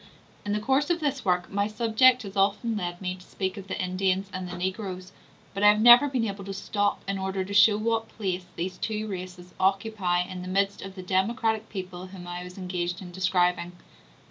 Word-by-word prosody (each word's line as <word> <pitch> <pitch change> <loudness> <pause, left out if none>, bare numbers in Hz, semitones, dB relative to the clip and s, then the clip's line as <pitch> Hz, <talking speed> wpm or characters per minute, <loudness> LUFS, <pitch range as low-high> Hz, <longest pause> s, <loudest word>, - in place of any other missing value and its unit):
In 205 - -2
the 210 - 0
course 270 +7 +1
of 345 -1 +1
this 285 -4 -1
work 180 -1 0
my 200 +1 +1
subject 235 +3 +4
has 200 -2 -8
often 205 +4 +1
led 175 -3 -4
me 180 -1 -2
to 185 - -12
speak 190 +1 -4
of 195 -2 -9
the - - -4
Indians 190 +1 0
and 185 -1 -4
the 180 - -6
Negroes; 185 0 -4 0.4
but 200 - -4
I 205 - +7
have 210 0 +4
never 240 +5 +9
been 255 -4 0
able 200 -2 -4
to 195 0 -5
stop 205 +1 -1
in 195 0 -2
order 190 0 -2
to 200 - -6
show 205 +1 +6
what 225 +1 -1
place 185 -4 -3
these 180 +2 -4
two 215 -1 -2
races 180 -2 -7
occupy 195 -2 +1
in 180 0 -7
the 180 - -7
midst 195 +2 0
of 195 0 -8
the 185 - -7
democratic 220 +4 0
people 185 -2 -6
whom 185 -1 -10
I 175 0 -5
was 180 +1 -10
engaged 180 -2 -3
in 180 -2 -9
describing. 180 -1 +1
195 Hz, 215 wpm, -27 LUFS, 185-215 Hz, 0.4 s, never